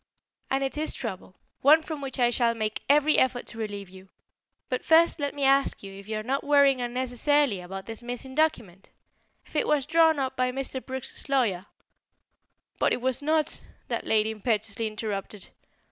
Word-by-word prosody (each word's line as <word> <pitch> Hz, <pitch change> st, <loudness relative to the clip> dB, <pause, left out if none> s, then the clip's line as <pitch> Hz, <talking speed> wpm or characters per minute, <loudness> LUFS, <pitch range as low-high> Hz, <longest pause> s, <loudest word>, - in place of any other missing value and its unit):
"And 270 Hz, +1 st, 0 dB
it 270 Hz, +2 st, -3 dB
is 310 Hz, -, +1 dB
trouble; -, -, -6 dB, 0.3 s
one 310 Hz, +3 st, +6 dB
from 315 Hz, -2 st, -6 dB
which 270 Hz, -1 st, -5 dB
I 240 Hz, -1 st, +4 dB
shall 235 Hz, -1 st, +1 dB
make 215 Hz, -1 st, -3 dB
every 295 Hz, +1 st, +5 dB
effort 255 Hz, -1 st, +1 dB
to 225 Hz, -, -8 dB
relieve 205 Hz, -3 st, -5 dB
you. 190 Hz, +1 st, -15 dB, 0.6 s
But 255 Hz, -, -3 dB
first 330 Hz, +1 st, +4 dB
let 285 Hz, -1 st, -2 dB
me 285 Hz, -, -3 dB
ask 275 Hz, -3 st, +3 dB
if 195 Hz, 0 st, -10 dB
you 215 Hz, 0 st, -3 dB
are 215 Hz, -, -4 dB
not 270 Hz, +4 st, -1 dB
worrying 280 Hz, -3 st, +4 dB
unnecessarily 250 Hz, -1 st, +1 dB
about 190 Hz, +2 st, -8 dB
this 225 Hz, 0 st, -5 dB
missing 245 Hz, +2 st, -7 dB
document? 230 Hz, -, -1 dB, 0.6 s
If -, -, -20 dB
it -, -, +1 dB
was 290 Hz, -3 st, +2 dB
drawn 320 Hz, 0 st, +4 dB
up 265 Hz, -1 st, -2 dB
by 255 Hz, -1 st, 0 dB
Mr. 265 Hz, 0 st, -4 dB
Brooks's 265 Hz, +2 st, -4 dB
lawyer 210 Hz, -9 st, +1 dB, 0.6 s
" -, -, -43 dB
"But -, -, +2 dB
it -, -, -2 dB
was 260 Hz, +2 st, 0 dB
not," 310 Hz, +1 st, 0 dB, 0.3 s
that -, -, -3 dB
lady 220 Hz, 0 st, +2 dB
impetuously 220 Hz, 0 st, -1 dB
interrupted. 210 Hz, -2 st, -5 dB
255 Hz, 180 wpm, -27 LUFS, 215-280 Hz, 0.6 s, one